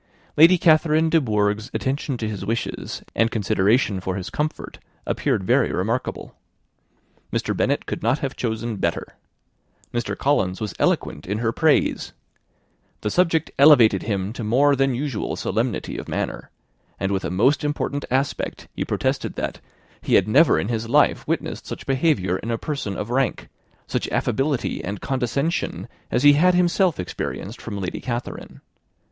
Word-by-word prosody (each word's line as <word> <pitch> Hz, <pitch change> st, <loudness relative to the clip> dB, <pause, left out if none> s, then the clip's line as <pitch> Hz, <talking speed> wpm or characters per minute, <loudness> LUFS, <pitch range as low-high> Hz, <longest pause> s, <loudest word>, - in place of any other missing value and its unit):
Lady 165 Hz, +4 st, +7 dB
Catherine 160 Hz, -1 st, +3 dB
de 165 Hz, 0 st, +4 dB
Bourgh's 105 Hz, -1 st, 0 dB
attention 135 Hz, 0 st, -2 dB
to 110 Hz, -, -3 dB
his 105 Hz, -3 st, -5 dB
wishes, 115 Hz, +4 st, -4 dB
and 115 Hz, +1 st, +3 dB
consideration 105 Hz, 0 st, +1 dB
for 95 Hz, 0 st, -3 dB
his 95 Hz, -2 st, -5 dB
comfort, 150 Hz, +1 st, -4 dB, 0.3 s
appeared -, -, 0 dB
very 125 Hz, +6 st, +2 dB
remarkable. 110 Hz, +7 st, -3 dB, 1.0 s
Mr. -, -, -1 dB
Bennet -, -, 0 dB
could -, -, -4 dB
not 120 Hz, +5 st, +2 dB
have 135 Hz, -2 st, -4 dB
chosen 115 Hz, -1 st, -3 dB
better. 85 Hz, -3 st, -2 dB, 0.8 s
Mr. 120 Hz, 0 st, -2 dB
Collins 95 Hz, -10 st, +1 dB
was 105 Hz, -2 st, -4 dB
eloquent 75 Hz, -, 0 dB
in 100 Hz, +3 st, -1 dB
her 115 Hz, 0 st, 0 dB
praise. 155 Hz, +5 st, +1 dB, 0.9 s
The 105 Hz, -, -2 dB
subject 165 Hz, -3 st, +2 dB
elevated 140 Hz, -6 st, +7 dB
him 100 Hz, -1 st, -2 dB
to 120 Hz, -, -6 dB
more 140 Hz, +7 st, +3 dB
than 135 Hz, -1 st, +1 dB
usual 135 Hz, -4 st, -3 dB
solemnity -, -, -2 dB
of -, -, -8 dB
manner; -, -, -3 dB, 0.5 s
and 95 Hz, +1 st, -1 dB
with 95 Hz, -1 st, -1 dB
a -, -, -2 dB
most 130 Hz, -, +2 dB
important 145 Hz, -1 st, -2 dB
aspect 135 Hz, +3 st, -2 dB
he -, -, -1 dB
protested -, -, -2 dB
that -, -, -4 dB, 0.4 s
he -, -, +1 dB
had 95 Hz, -, +4 dB
never 145 Hz, +10 st, +5 dB
in 100 Hz, -, -2 dB
his 115 Hz, -1 st, -2 dB
life 145 Hz, +4 st, +3 dB
witnessed -, -, -3 dB
such -, -, -7 dB
behaviour 135 Hz, -, +1 dB
in 115 Hz, -, -6 dB
a 115 Hz, -, 0 dB
person 125 Hz, -8 st, -4 dB
of 105 Hz, +3 st, -4 dB
rank 130 Hz, -1 st, 0 dB, 0.4 s
such -, -, -2 dB
affability 135 Hz, -, -1 dB
and 100 Hz, +3 st, -4 dB
condescension, 140 Hz, +5 st, -2 dB, 0.2 s
as 125 Hz, -, 0 dB
he 145 Hz, 0 st, +8 dB
had 180 Hz, +5 st, +4 dB
himself 180 Hz, -, +2 dB
experienced 95 Hz, +4 st, -5 dB
from 100 Hz, -3 st, -5 dB
Lady 90 Hz, -2 st, -4 dB
Catherine. 120 Hz, -1 st, -5 dB
120 Hz, 155 wpm, -23 LUFS, 105-145 Hz, 1.0 s, he